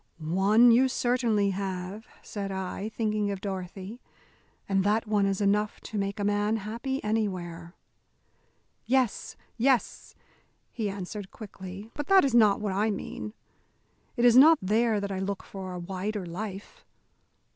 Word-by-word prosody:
"One 195 +9 +4
you 250 +3 +5
certainly 240 -5 +1
have," 190 +2 -5 0.2
said 200 -2 -5
I, 190 +2 -4
thinking 215 -2 -1
of 200 -1 -3
Dorothy, 190 +3 -6 0.7
"and 195 -1 +2
that 210 +3 +1
one 210 -2 +2
is 195 +1 -1
enough 205 +1 +1
to 215 - -6
make 200 +1 -3
a - - -1
man 205 +1 +1
happy 235 +6 -4
anywhere." 180 -6 -3 1.1
"Yes, 255 -3 0 0.2
yes," 250 0 0 0.6
he 220 -3 -2
answered, 195 +1 -6
quickly, 195 0 -9
"but 295 -1 -5
that 385 -5 +6
is 270 - 0
not 215 -4 +5
what 210 -3 -2
I 210 +3 +1
mean. 215 +1 -5 0.8
It 240 - +3
is 240 -1 +6
not 310 +5 +8
there 215 +3 +1
that 200 0 -4
I 190 - -3
look 195 0 -3
for 190 -2 -7
a 180 - -5
wider 190 +3 -4
life. 195 +3 -7
205 Hz, 145 wpm, -28 LUFS, 195-225 Hz, 1.1 s, not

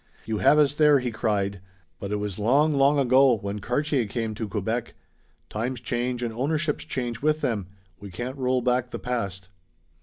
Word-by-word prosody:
"You 110 -1 -2
have 150 - +5
us 145 -2 +4
there!" 150 -1 +5
he 125 -2 -2
cried, 100 -4 -1 0.4
"but 100 - -5
it - - +1
was 105 -1 -4
long, 140 +8 +3
long 140 +1 +4
ago, 130 -2 +5
when 100 0 -5
Cartier 125 +2 0
came 110 0 -3
to 110 +1 -4
Quebec. 110 +4 -3 0.5
Times 120 +3 -3
change 120 +1 -2
and 115 -2 -2
ownerships 150 +5 -1
change 120 -3 -4
with 155 +1 +1
them. 105 -7 -1 0.3
We 100 - -9
can't 120 +9 -5
roll 130 0 +1
back 125 0 +1
the - - -5
past." 100 -7 -4
120 Hz, 180 wpm, -25 LUFS, 105-135 Hz, 0.5 s, have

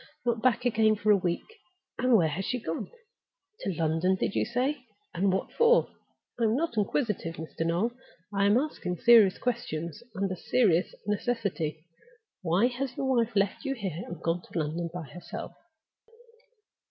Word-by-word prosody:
Not 235 -2 +1
back 250 0 +2
again 220 -2 +4
for 210 0 +2
a - - +7
week! 175 -3 -1 0.5
And 250 -2 +5
where 170 -5 +3
has 175 +6 -3
she 250 +5 -1
gone? 165 -7 -4 0.7
To 195 - -2
London, 165 +3 +2
did 190 - -1
you - - +1
say? 250 +5 -1 0.3
And 190 +2 +2
what 190 - -1
for?—I 470 - +1
am 220 +1 +2
not 325 -1 -1
inquisitive, 210 - -1
Mr. 160 -1 -9
Noel; 175 +8 +1 0.4
I 200 0 +2
am 205 +3 +5
asking 250 -10 -2
serious 220 -2 +6
questions, 210 -7 -3
under 195 -1 -1
serious 185 -3 +2
necessity. 200 -7 -2 0.6
Why 180 +5 +3
has 250 +1 -2
your 265 -1 +1
wife 235 -1 +1
left 200 +5 +1
you 275 -2 -1
here, 185 - -4
and 175 - -7
gone 170 +1 0
to 175 - -8
London 165 +2 -2
by 175 0 -5
herself?" 175 +4 -8
200 Hz, 160 wpm, -28 LUFS, 175-240 Hz, 0.7 s, a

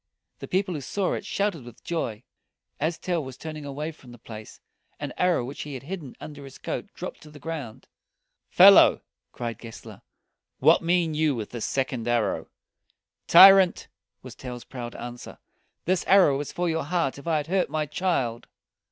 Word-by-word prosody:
The - - -7
people 185 0 0
who 150 - -4
saw 190 +7 -1
it - - -5
shouted 200 -8 -1
with 120 -1 -14
joy. 120 -10 -3 0.6
As 160 +2 -1
Tell 175 -4 -2
was 130 -2 -9
turning 155 -2 -7
away 145 +3 -4
from 135 -5 -16
the 120 - -12
place, 110 -2 -11 0.4
an - - -5
arrow 180 -9 +1
which 135 +3 -7
he 145 -2 -6
had 130 - -8
hidden 160 -4 -7
under 145 -2 -9
his 135 -1 -11
coat - - -5
dropped - - -7
to 155 - -13
the 150 - -13
ground. 145 -7 -7 0.6
"Fellow!" - - +7 0.3
cried 115 -3 -5
Gessler, 115 -2 -11 0.6
"what 155 +5 +5
mean 170 -1 +1
you 155 -2 +1
with 110 -3 -6
this 120 -3 -4
second 130 -3 -2
arrow?" 120 0 0 0.8
"Tyrant!" 190 +1 +7 0.3
was - - -9
Tell's 125 -2 -8
proud 120 -2 -7
answer, 120 0 -8 0.5
"this 185 +1 +1
arrow 190 -8 +6
was 145 +1 -4
for 175 0 -2
your 160 -3 -1
heart 160 -4 -1
if 140 - -13
I 160 -2 +2
had 150 - -2
hurt 185 +2 0
my 155 -1 -1
child." 140 -8 -2
150 Hz, 180 wpm, -26 LUFS, 125-170 Hz, 0.8 s, Fellow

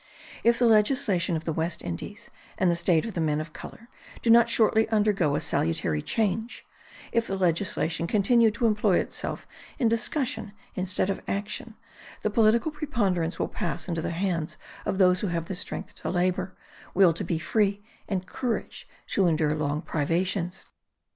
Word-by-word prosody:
If 235 0 +4
the 245 - +3
legislation 215 -5 +3
of 160 - -6
the 160 - -1
West 165 +2 -2
Indies 85 -1 -7 0.3
and 185 -2 +3
the - - +1
state 170 -1 +2
of 225 - -5
the 170 - -2
men 150 -1 +1
of 155 0 -6
colour 230 - -10 0.4
do 230 - +4
not 235 0 +7
shortly 220 -1 +3
undergo 205 -9 +2
a - - -1
salutary 80 -1 0
change; 220 - -1 0.5
if 230 -1 +1
the 195 - -2
legislation 170 -2 0
continue 220 +4 +4
to 215 +3 -1
employ 210 -4 +3
itself - - -3 0.3
in 245 - +2
discussion 240 -1 -1 0.2
instead 185 +1 0
of - - -4
action, 210 +3 -4 0.5
the 215 - +1
political 230 +7 +3
preponderance 200 - -1
will - - -1
pass - - -4
into 170 -2 -2
the - - -2
hands 170 -2 -2 0.3
of 190 - 0
those 180 -1 +4
who 205 - -1
have 170 +1 -3
strength 190 - -6
to - - -3
labour, 185 +1 -1 0.4
will 180 -3 +6
to 165 - -4
be 170 - -1
free, 200 +4 0 0.3
and 190 -3 -1
courage 235 +4 -4 0.2
to 195 -3 +3
endure 155 -2 +2
long 150 +1 -1
privations. 175 +4 -1
190 Hz, 165 wpm, -27 LUFS, 170-220 Hz, 0.5 s, not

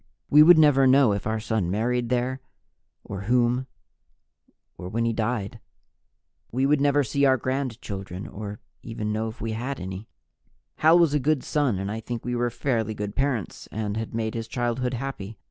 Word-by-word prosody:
We 150 - +8
would 170 +2 +8
never 145 -4 +5
know 130 -3 +5
if 100 +1 -3
our 110 0 -1
son 110 -5 -1
married 120 +4 0
there, 125 +1 -1 0.6
or 100 - -6
whom, 125 +1 +2 1.1
or 90 - -7
when 115 +4 -1
he 115 - +1
died. 110 -2 -2 0.9
We 130 +3 +1
would 145 0 +3
never 145 0 +3
see 140 +3 -1
our 130 -1 +4
grandchildren, 110 -8 -4
or 105 0 -7 0.2
even 110 -2 -4
know 110 +1 -1
if 110 +2 -8
we 115 - -2
had 125 +5 -4
any. 95 +3 -6 0.7
Hal 160 +2 +6
was 170 -4 +4
a 150 - +3
good 145 0 +1
son 140 -9 0
and 100 +2 -3
I 110 - -4
think 115 +1 -6
we 125 0 -1
were 120 0 0
fairly 115 -3 -1
good 105 0 -5
parents 130 -8 -2
and 105 -1 -3
had 110 0 -4
made 110 -1 -2
his 115 -1 -4
childhood 125 +1 -1
happy. 115 -5 -6
120 Hz, 180 wpm, -25 LUFS, 110-135 Hz, 1.1 s, We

